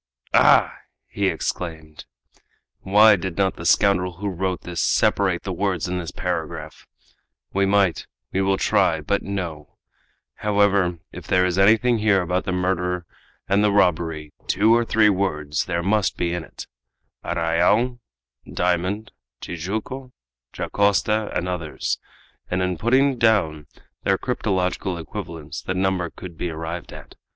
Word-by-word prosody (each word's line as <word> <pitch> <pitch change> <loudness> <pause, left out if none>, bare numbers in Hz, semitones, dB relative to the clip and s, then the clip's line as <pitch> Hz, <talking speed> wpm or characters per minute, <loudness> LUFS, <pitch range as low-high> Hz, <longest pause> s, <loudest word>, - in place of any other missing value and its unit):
"Ah!" - - +5 0.3
he - - -1
exclaimed, 80 -3 -4 0.7
"why 105 +2 +6
did 95 -2 -5
not 95 -1 +1
the 85 - -4
scoundrel 90 -3 +3
who 100 +4 -4
wrote 95 0 -2
this 85 -2 -4
separate - - +2
the - - -3
words - - -1
in 90 0 -2
this 85 -2 -5
paragraph? 85 -4 -5 0.7
We 100 0 +2
might 95 -5 +2 0.3
we 95 - +1
will 95 0 +2
try 80 -3 +2
but 100 +7 0
no! 85 -7 -6 0.6
However, 100 -4 +2
if - - -10
there 90 0 +3
is 90 +1 0
anything 110 +4 +4
here 105 -2 +3
about 90 +2 -1
the - - -1
murder 90 -1 -1 0.4
and 100 +2 +3
the 105 - +3
robbery, 80 -6 +1
two 110 +4 +4
or 120 - +3
three 110 -2 +4
words 75 -7 -1
there 85 -1 -2
must 105 +1 +1
be 85 -1 -1
in 85 -2 -3
it - - -10 0.6
'arrayal,' 90 +10 +1 0.5
'diamond,' 90 +4 -1 0.3
'Tijuco,' 110 +9 -5 0.4
'Dacosta,' 100 +2 +1
and 90 - -2
others; 85 -4 -3 0.5
and 90 0 0
in 90 -1 -1
putting 130 +4 +2
down 85 -10 +2 0.3
their - - +2
cryptological 90 -1 -1
equivalents 85 -3 -7
the 95 - -3
number 95 -2 0
could 85 -2 -10
be 90 - -2
arrived 80 +1 -6
at. - - -11
95 Hz, 140 wpm, -23 LUFS, 85-100 Hz, 0.7 s, why